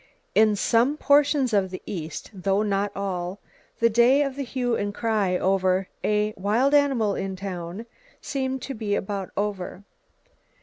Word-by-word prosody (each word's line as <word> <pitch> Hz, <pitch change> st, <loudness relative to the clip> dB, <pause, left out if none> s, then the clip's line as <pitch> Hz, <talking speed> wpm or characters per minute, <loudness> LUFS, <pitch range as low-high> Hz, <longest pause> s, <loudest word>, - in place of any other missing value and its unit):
In 215 Hz, -1 st, +4 dB
some 235 Hz, +8 st, +2 dB
portions 285 Hz, -4 st, +3 dB
of 195 Hz, -2 st, +2 dB
the 185 Hz, -, -8 dB
east, 165 Hz, -5 st, -6 dB
though 195 Hz, +2 st, 0 dB
not 200 Hz, -1 st, 0 dB
all, 185 Hz, -1 st, -3 dB, 0.4 s
the 230 Hz, -, +4 dB
day 240 Hz, +5 st, +4 dB
of 275 Hz, -2 st, -3 dB
the 280 Hz, -, -4 dB
hue 245 Hz, -2 st, -1 dB
and 205 Hz, 0 st, -3 dB
cry 210 Hz, -5 st, +1 dB
over 190 Hz, 0 st, +1 dB
"a 210 Hz, 0 st, +1 dB
wild 220 Hz, +9 st, +1 dB
animal 270 Hz, -8 st, +3 dB
in 195 Hz, 0 st, -3 dB
town" 185 Hz, +2 st, -6 dB, 0.3 s
seems 265 Hz, -2 st, -3 dB
to 275 Hz, -, -5 dB
be 215 Hz, -3 st, -2 dB
about 195 Hz, -1 st, -3 dB
over. 200 Hz, -2 st, -3 dB
210 Hz, 150 wpm, -25 LUFS, 195-245 Hz, 0.4 s, In